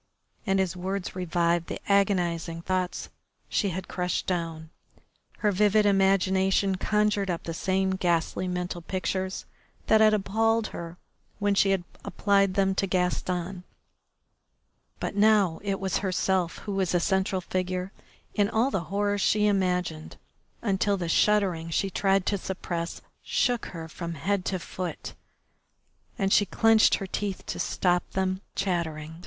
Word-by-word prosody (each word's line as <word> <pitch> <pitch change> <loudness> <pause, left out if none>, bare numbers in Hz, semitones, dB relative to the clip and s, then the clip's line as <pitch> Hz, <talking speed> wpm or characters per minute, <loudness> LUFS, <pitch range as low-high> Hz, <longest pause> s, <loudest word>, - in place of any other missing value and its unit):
And 195 0 +2
his 190 -1 0
words 185 +1 -4
revived 170 -1 0
the - - -5
agonising 175 -4 +1
thoughts 185 -1 -2 0.4
she 200 - +1
had 185 +1 -5
crushed 180 0 -2
down. 165 -3 -3 0.7
Her 210 - +3
vivid 210 +2 +3
imagination 195 0 +3
conjured 210 -1 +1
up 170 -2 -2
the 165 - -4
same 190 +3 0
ghastly 175 +1 0
mental 180 -1 -3
pictures 185 +2 -3 0.4
that 220 0 +4
had 215 0 +6
appalled 225 +2 +1
her 170 0 -7 0.4
when 205 -1 +1
she 195 0 +3
had 195 -2 +1 0.2
applied 195 -2 +2
them 195 -1 +2
to 195 +1 0
Gaston, 180 0 -1 1.4
but - - -3
now 205 -5 +4
it 195 -1 -2
was 190 -1 0
herself 185 -2 0
who 205 - -3
was 190 -3 0
the 175 - +3
central 190 +1 +1
figure 185 +1 -3 0.4
in 205 -1 +2
all 235 +5 +1
the 175 -8 -2
horrors 205 +3 0
she 210 +1 +3
imagined, 180 -5 0 0.5
until 200 -1 +1
the 175 -3 -3
shuddering 185 -4 +2
she 195 +4 0
tried 195 0 +2
to 200 - 0
suppress 175 -2 -4 0.2
shook 245 -2 0
her 165 -2 -7
from 170 +1 -6
head 190 +5 -1
to 190 - -1
foot, 180 0 -6 1.0
and 195 -3 +1
she 205 - +4
clenched 225 +3 +4
her 195 - -4
teeth 195 0 -4
to - - -5
stop 180 -1 +1
them 190 0 -1
chattering. 160 -5 -2
190 Hz, 145 wpm, -27 LUFS, 175-200 Hz, 1.4 s, had